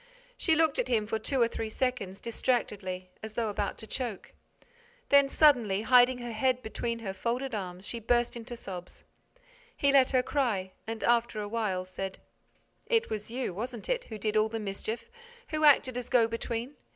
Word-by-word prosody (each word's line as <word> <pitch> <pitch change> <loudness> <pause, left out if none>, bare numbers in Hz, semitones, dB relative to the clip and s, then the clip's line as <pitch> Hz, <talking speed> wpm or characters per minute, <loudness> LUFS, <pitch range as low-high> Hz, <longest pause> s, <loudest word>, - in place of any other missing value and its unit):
She 325 -8 +2
looked 320 - +2
at - - +1
him 220 -3 +1
for 220 +1 -2
two 265 +5 -1
or - - +4
three 225 -1 -4
seconds, 250 -6 -2
distractedly, 200 -6 -2
as 220 0 -7
though 225 -1 -1
about 205 -1 -2
to - - -9
choke. 235 -4 -5 0.8
Then, 280 -1 +6
suddenly 240 -10 +4
hiding 250 +1 +6
her 240 -1 -5
head 255 +2 +1
between 230 +1 -3
her 190 - -2
folded 240 +6 -2
arms, 185 -2 -5
she 235 - -5
burst 240 +2 +1
into 240 +1 -7
sobs. 180 -6 -8 0.7
He 280 - +3
let 270 -2 +6
her 255 -1 +3
cry 225 -10 0 0.2
and, 225 0 -4
after 235 -2 +2
a 205 - -3
while, 205 -4 -1
said: 190 +1 -5 0.7
"It 455 - +2
was 215 0 -3
you, 245 -4 -3
wasn't 235 +3 -5
it, - - 0
who 220 - -7
did 215 +1 -1
all 215 0 +3
the 225 0 -3
mischief, 215 - -5 0.4
who 310 -1 +1
acted 265 -3 +5
as 245 - -7
go 235 -3 +5
between? 230 +3 -4
230 Hz, 185 wpm, -30 LUFS, 210-255 Hz, 0.8 s, Then